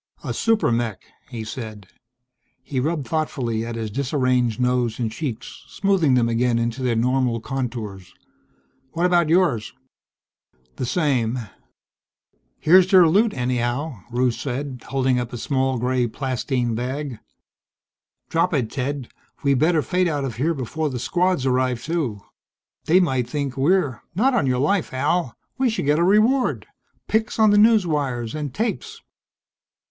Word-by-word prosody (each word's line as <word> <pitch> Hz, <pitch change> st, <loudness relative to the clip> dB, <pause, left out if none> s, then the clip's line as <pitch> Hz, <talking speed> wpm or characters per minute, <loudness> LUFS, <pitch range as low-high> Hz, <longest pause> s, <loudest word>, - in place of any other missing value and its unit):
"A -, -, -3 dB
super 225 Hz, -, +2 dB
mech!" 115 Hz, -5 st, -2 dB, 0.3 s
he 115 Hz, -3 st, -5 dB
said. 110 Hz, -2 st, -7 dB, 0.8 s
He 135 Hz, -1 st, -3 dB
rubbed 150 Hz, -1 st, -1 dB
thoughtfully 125 Hz, -7 st, -1 dB
at 115 Hz, 0 st, -5 dB
his 110 Hz, -2 st, -4 dB
disarranged 125 Hz, -3 st, 0 dB
nose 125 Hz, -2 st, +1 dB
and 115 Hz, -3 st, -2 dB
cheeks, 125 Hz, -2 st, -6 dB
smoothing 185 Hz, -9 st, +2 dB
them 120 Hz, -2 st, +3 dB
again 115 Hz, +1 st, +1 dB
into 115 Hz, +2 st, -2 dB
their 125 Hz, -2 st, +1 dB
normal 125 Hz, 0 st, +1 dB
contours. 115 Hz, -7 st, -5 dB, 0.8 s
"What 170 Hz, +2 st, 0 dB
about 175 Hz, -3 st, +3 dB
yours?" 165 Hz, -, +2 dB, 1.0 s
"The 125 Hz, -, -2 dB
same." 130 Hz, -7 st, +1 dB, 1.2 s
"Here's 185 Hz, +3 st, +5 dB
their 185 Hz, -3 st, +7 dB
loot, 210 Hz, +7 st, +3 dB
anyhow," 125 Hz, +2 st, -2 dB
Rusche 125 Hz, 0 st, 0 dB
said, 135 Hz, -1 st, -4 dB
holding 130 Hz, -1 st, +1 dB
up 120 Hz, -1 st, -4 dB
a -, -, -4 dB
small 130 Hz, +1 st, 0 dB
gray 125 Hz, +1 st, 0 dB
plastine 125 Hz, -1 st, -2 dB
bag. 130 Hz, +1 st, -4 dB, 1.1 s
"Drop 165 Hz, +1 st, +1 dB
it, 125 Hz, -6 st, -1 dB
Ted. 135 Hz, -1 st, -3 dB, 0.4 s
We 140 Hz, -1 st, +3 dB
better 155 Hz, +3 st, +2 dB
fade 180 Hz, -1 st, +1 dB
out 145 Hz, -4 st, -1 dB
of 120 Hz, -4 st, -5 dB
here 160 Hz, +6 st, 0 dB
before 150 Hz, +4 st, -2 dB
the 130 Hz, -, -4 dB
Squads 175 Hz, +2 st, 0 dB
arrive, 130 Hz, -2 st, +1 dB
too. 150 Hz, -11 st, -2 dB, 0.6 s
They 175 Hz, +4 st, +5 dB
might 130 Hz, -9 st, 0 dB
think 140 Hz, -2 st, -3 dB
we're 145 Hz, -1 st, +1 dB
" -, -, -43 dB
"Not 260 Hz, +8 st, +3 dB
on 230 Hz, -, +2 dB
your 125 Hz, -1 st, +1 dB
life, 150 Hz, +3 st, 0 dB
Al. 145 Hz, +1 st, 0 dB, 0.2 s
We 260 Hz, -2 st, +3 dB
should 220 Hz, -9 st, -2 dB
get 150 Hz, +2 st, +3 dB
a -, -, +3 dB
reward. 215 Hz, +8 st, +3 dB, 0.4 s
Pics 220 Hz, 0 st, 0 dB
on 215 Hz, -2 st, +5 dB
the 205 Hz, -, +4 dB
newswires 150 Hz, -, +2 dB
and 150 Hz, -3 st, -4 dB
tapes." 240 Hz, -, -3 dB
135 Hz, 150 wpm, -22 LUFS, 120-165 Hz, 1.2 s, their